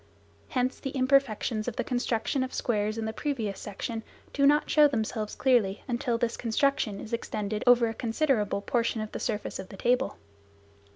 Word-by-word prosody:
Hence 255 -1 0
the 270 - -4
imperfections 255 -4 +2
of 240 - -2
the - - -1
construction 245 +1 -1
of 260 - -5
squares 215 -2 0
in 225 - -2
the 220 - -3
previous 225 -8 -2
section 225 +3 -5 0.3
do 280 -1 +4
not 295 +1 +4
show 300 -1 +6
themselves 220 -4 -2
clearly 230 -7 +2
until 240 -1 0
this 235 0 -1
construction 230 -3 0
is 225 - -8
extended 215 -2 -2
over 245 -1 +6
a 225 - -3
considerable 225 -3 0
portion 230 -1 0
of 215 - -5
the - - -5
surface 210 -3 -3
of 190 - -7
the 195 - -10
table. 245 +5 +1
235 Hz, 175 wpm, -28 LUFS, 215-255 Hz, 0.3 s, show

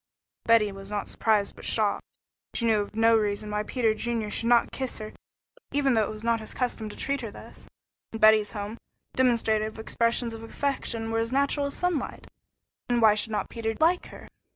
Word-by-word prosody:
Betty 225 -3 +4
was 195 +1 -10
surprised 210 -3 +1
but - - -13
not - - 0
shocked. 215 -2 +1 0.5
She 235 - +1
knew 220 -2 +3
of 205 - -7
no 225 +1 +5
reason 210 -1 -1
why 210 0 0
Peter 225 0 0
should 225 -1 -2
not 240 0 +4
kiss 260 -2 -3
her 215 -1 -7 0.6
even 280 -2 +2
though 225 - +3
it 210 - -1
was 215 0 -7
not 230 0 +2
his 220 - -8
custom 240 -4 -2
to - - -10
treat 280 -1 -1
her 230 - -5
thus. - - -13 0.4
In 225 - -5
Betty's 215 -1 +5
home, 210 +2 -5 0.4
demonstrative 225 -4 +1
expressions 230 +1 0
of 225 - -8
affection 230 -2 -2
were 225 - +1
as 230 +1 -1
natural 280 +1 +1
as 280 - -4
sunlight, 355 -7 -2 0.6
and 240 -1 +2
why 220 -2 +6
should 215 +1 0
not 210 - -2
Peter 225 -1 -3
like 340 +3 +2
her? - - -12
225 Hz, 195 wpm, -27 LUFS, 215-240 Hz, 0.6 s, why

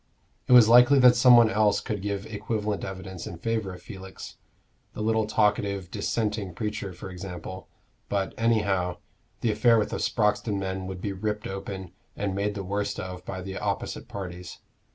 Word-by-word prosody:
It - - +4
was 120 -3 +9
likely 125 +4 +7
that 125 -2 +7
some 125 0 +7
one 115 -2 +6
else 105 +1 +3
could 105 -5 -4
give 100 0 -3
equivalent 105 -1 -3
evidence 95 -2 -6
in 85 - -7
favor 110 +1 -2
of 90 -1 -11
Felix 95 -2 -9 0.6
the - - -6
little 110 0 +1
talkative 100 -3 +1
Dissenting 105 -5 -2
preacher, 105 -2 -3
for 90 +1 -9
example: 90 0 -7 0.4
but, 100 -1 -1
anyhow, 100 -6 +1 0.4
the 115 - +2
affair 115 +2 +4
with 105 - 0
the - - -2
Sproxton 105 -1 +1
men 95 -1 -3
would 95 -1 -6
be 100 0 -2
ripped 105 +2 -3
open 95 -2 -6 0.2
and 100 -1 -2
made 100 +1 -1
the 100 - -4
worst 100 +2 -2
of 90 -1 -6
by 95 -1 -5
the 95 0 -5
opposite - - -3
parties. 90 -2 -7
100 Hz, 175 wpm, -27 LUFS, 95-110 Hz, 0.6 s, was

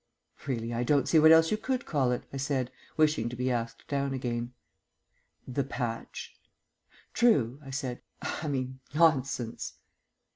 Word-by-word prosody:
"Really, 120 -3 -2
I 115 - -1
don't 140 +1 +2
see 160 - +5
what 160 +1 +8
else 160 0 +7
you 215 - +2
could 255 +3 -2
call 135 -5 +1
it," 125 - -1
I - - -3
said, 135 -2 -1 0.3
wishing 150 -7 +3
to 125 - -6
be 125 +1 0
asked 115 -1 -3
down 140 -1 -1
again. 120 -2 -3 1.0
"The 135 +2 -1
patch." 120 -3 -5 0.8
"True," 145 - +3
I 135 - -10
said. 130 -2 -3 0.2
"I 155 - -4
mean, 130 -2 -2 0.2
Nonsense." 140 -7 +2
130 Hz, 150 wpm, -29 LUFS, 120-150 Hz, 1.0 s, what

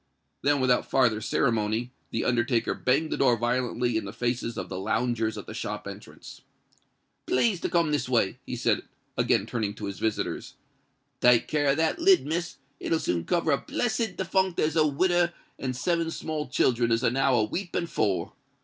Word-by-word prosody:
Then, 145 +1 +2
without 125 -1 +2
farther 120 -5 +3
ceremony, 115 +1 0 0.2
the - - -2
undertaker 120 -1 +1
banged 140 +5 +1
the - - -1
door 125 -3 +3
violently 120 0 0
in 110 - -3
the 100 - -6
faces 120 -1 -2
of 95 - -4
the 95 0 -5
loungers 110 +2 0
at - - -7
the - - -8
shop - - -5
entrance. - - -11 0.9
"Please 185 - +2
to - - -1
come 170 -3 +2
this 145 -3 -1
way," 115 -6 +1
he - - -5
said, - - +1 0.3
again - - +2
turning 105 -4 -2
to 105 - -6
his 100 -1 -6
visitors. 110 -2 -2 0.6
"Take 125 -1 +5
care 150 -1 +1
of 140 - +2
that 160 - +1
lid, 370 +2 +5
Miss; 170 +3 -3 0.2
it'll 165 - 0
soon 85 - -1
cover 170 -2 +1
a 140 - +2
blessed 225 -4 -2
defunct 190 -1 0
as 155 +1 +1
a 155 -2 +4
widder 175 +3 +2 0.3
and 130 -2 -3
seven 165 +5 0
small 155 -2 -4
childern 120 -2 +2
is 115 0 +2
now 135 +2 +2
a 110 - +3
weeping 175 - -2
for. 100 - -1
130 Hz, 180 wpm, -27 LUFS, 115-165 Hz, 0.9 s, Take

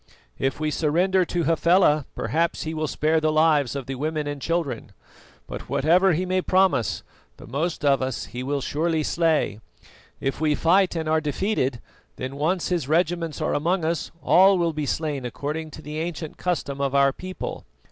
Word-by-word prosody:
If 135 +1 -1
we 155 -1 -1
surrender 180 +5 +2
to 175 0 -1
Hafela, 165 -3 +3
perhaps 165 +1 -1
he 160 - -4
will 155 -1 -2
spare 155 +2 +1
the 155 0 +2
lives 155 -4 +3
of 140 -2 -4
the 135 - -4
women 150 +3 -2
and 145 -1 -5
children; 165 -3 -2 0.5
but - - -8
whatever 175 +6 +3
he 180 +4 0
may 185 0 +1
promise, 185 - +2 0.3
the - - -12
most 155 +5 -2
of 140 -1 +3
us 130 -3 -3
he 125 - -7
will 140 +2 -2
surely 160 +3 0
slay. 160 -11 +1 0.6
If 135 +3 -3
we 150 -1 +2
fight 180 +4 +3
and 160 -1 -2
are 155 0 +2
defeated, 145 - -1 0.4
then 130 +2 -5
once 165 +5 0
his 170 -7 -1
regiments 165 0 0
are - - 0
among 170 +3 0
us, 165 +1 -1
all 190 +1 +6
will 170 -2 +1
be 150 -1 -3
slain 150 -2 -2
according 150 +6 -4
to 155 +1 -11
the 150 +1 -5
ancient 160 -1 -4
custom 140 -6 -2
of 140 0 0
our 140 -1 +4
people. 185 +3 -6
155 Hz, 180 wpm, -24 LUFS, 145-170 Hz, 0.6 s, all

